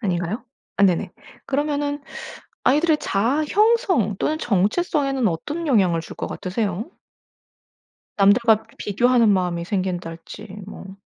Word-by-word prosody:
아닌가요? 190 +3 -2 0.3
아 200 - +1
네네. 180 -3 +1 0.3
그러면은 290 +1 -1 0.6
아이들의 300 +3 +3
자아 250 +10 0
형성 405 - +2
또는 310 +1 0
정체성에는 270 - +1
어떤 295 - -4
영향을 190 - +3
줄 160 - -10
것 - - -4
같으세요? 200 - -3 1.2
남들과 215 +2 +4
비교하는 235 +2 +3
마음이 180 -3 0
생긴달지 180 +1 -4 0.2
뭐. 195 -1 -10
220 Hz, 280 characters per minute, -22 LUFS, 185-290 Hz, 1.2 s, 남들과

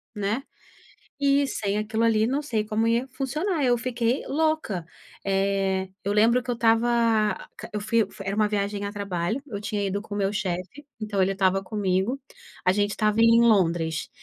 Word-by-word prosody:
né. 210 +5 -1 0.8
E, 280 0 +4
sem 205 -6 -2
aquilo 220 +2 -1
ali, 220 -1 +3
não 270 +5 0
sei 225 -7 -1
como 220 +1 0
ia 235 +3 +1
funcionar, 300 +6 -2
eu 245 -1 +3
fiquei 240 +1 -1
louca. 310 - 0 0.4
Eh, 195 -1 0 0.2
eu 200 +1 0
lembro 230 +4 +4
que 245 - -11
eu 240 - +1
estava 230 +1 +3 0.5
a - - -10
q - - -9
eu - - -1
fui 215 0 +1 0.2
era 195 +1 -2
uma 215 -1 +3
viagem 205 0 -1
a 200 - -3
trabalho, 200 +2 -2
eu 205 -7 -6
tinha 205 -1 -2
ido 200 +1 -2
com 205 -1 -7
o - - -2
meu 195 0 0
chefe, 190 +7 -4 0.2
então 210 -2 -1
ele 190 +1 +2
estava 195 0 +1
comigo. 200 +5 -1 0.5
A 185 - +5
gente 205 +1 +1
estava 215 0 +1
em 230 0 +6
Londres, 170 -8 +2
210 Hz, 185 wpm, -25 LUFS, 195-235 Hz, 0.8 s, em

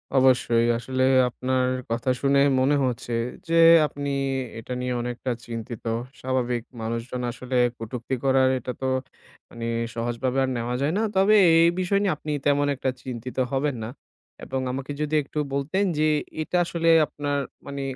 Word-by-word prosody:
অবশ্যই। 125 -3 +4
আসলেই 130 +2 +1 0.2
আপনার 130 +1 0 0.2
কথা 115 +3 -1
শুনেই 140 0 +4
মনে 140 +3 +3
হচ্ছে 120 -1 -3 0.3
যে 165 - -2 0.3
আপনি 145 0 -5 0.5
এটা 125 +2 -6
নিয়ে 125 0 -2
অনেকটা 125 +1 -3 0.2
চিন্তিত। 115 0 -6 0.4
স্বাভাবিক, 125 -2 -1 0.2
মানুষজন 115 +2 -4
আসলে 130 +1 -6 0.2
কটুক্তি 120 +3 -4
করার 130 -1 +4
এটা 125 - -5
তো - - -2 0.6
মানে 115 0 -7 0.3
সহজভাবে 120 +3 -2
আর 130 - 0
নেওয়া 120 +1 -2
যায় 150 +4 +1
না। - - +1
তবে 200 +3 +5 0.2
এই 170 +1 +6
বিষয় 195 +2 +1
নিয়ে 190 - +2
আপনি 150 - -5
তেমন 145 0 +3
একটা 130 0 -1
চিন্তিত 125 0 -7
হবেন 140 0 0
না। 110 - -5 0.5
এবং 130 0 -3
আমাকে 135 +2 -5
যদি 150 +1 -1
একটু 150 +2 -5
বলতেন 155 +9 0
যে 155 - +2 0.4
এটা 180 +3 -1
আসলে 165 -1 0 0.2
আপনার 145 -1 -3 0.3
মানে 140 0 -5
130 Hz, 155 wpm, -25 LUFS, 120-145 Hz, 0.6 s, এই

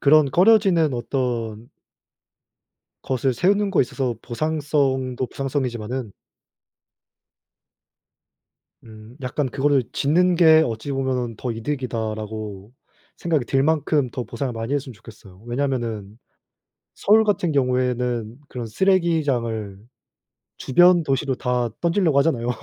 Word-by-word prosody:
그런 145 0 +5
꺼려지는 185 -3 +4
어떤 120 -3 -3 1.4
것을 130 0 0
세우는 200 - +2
거에 190 - +3
있어서 125 -1 -3
보상성도 135 -2 -1
보상성이지만은 125 -4 -4 2.7
음 110 +1 -14
약간 130 +1 -2
'그거를 140 0 +1
짓는 175 +6 +2
게 160 -2 +6
어찌 115 +4 -5
보면은 130 -4 -2
더 125 - -3
이득이다.'라고 110 -4 -5 0.4
생각이 160 -6 0
들 135 +2 +1
만큼 150 -3 +1
더 125 -1 -4
보상을 130 +3 -4
많이 115 +4 -3
했으면 135 -2 -3
좋겠어요. 105 -3 -15
왜냐하면은 120 -5 -3 0.8
서울 220 +2 +4
같은 200 -5 0
경우에는 125 -3 -1
그런 120 -2 -5
쓰레기장을 135 - 0 0.8
주변 175 +5 +4
도시로 135 -1 0
다 125 -1 -1
던지려고 170 -4 +2
하잖아요. 130 -5 +1
130 Hz, 275 characters per minute, -22 LUFS, 115-150 Hz, 2.7 s, 게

